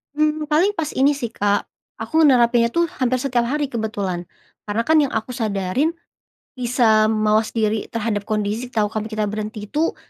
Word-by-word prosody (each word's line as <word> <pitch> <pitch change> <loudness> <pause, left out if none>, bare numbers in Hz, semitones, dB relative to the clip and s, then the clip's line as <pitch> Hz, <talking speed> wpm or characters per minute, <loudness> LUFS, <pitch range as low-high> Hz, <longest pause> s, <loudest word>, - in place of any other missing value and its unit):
Mmm, 305 0 +1
paling 355 +7 +4
pas 320 -5 -2
ini 280 +2 +3
sih 235 -5 -4
Kak, 205 0 +1 0.4
aku 315 - -5
nerapinnya 240 -2 +4
tuh 340 +8 +1 0.2
hampir 255 0 +2
setiap 245 -3 +1
hari 290 0 -1
kebetulan, 200 -6 -3 0.4
karena 220 +3 0
kan 320 +5 +3
yang 280 -3 +1
aku 220 +3 -2
sadarin, 220 - -1 0.6
bisa 230 -3 +3
mawas 215 0 +2
diri 220 -1 0
terhadap 220 -3 -2
kondisi, 215 +3 -2
tahu 215 -3 +1
kami 215 0 -3
kita 215 -1 -1
berhenti 215 0 -5
itu, 315 +2 0
230 Hz, 165 wpm, -21 LUFS, 215-270 Hz, 0.6 s, paling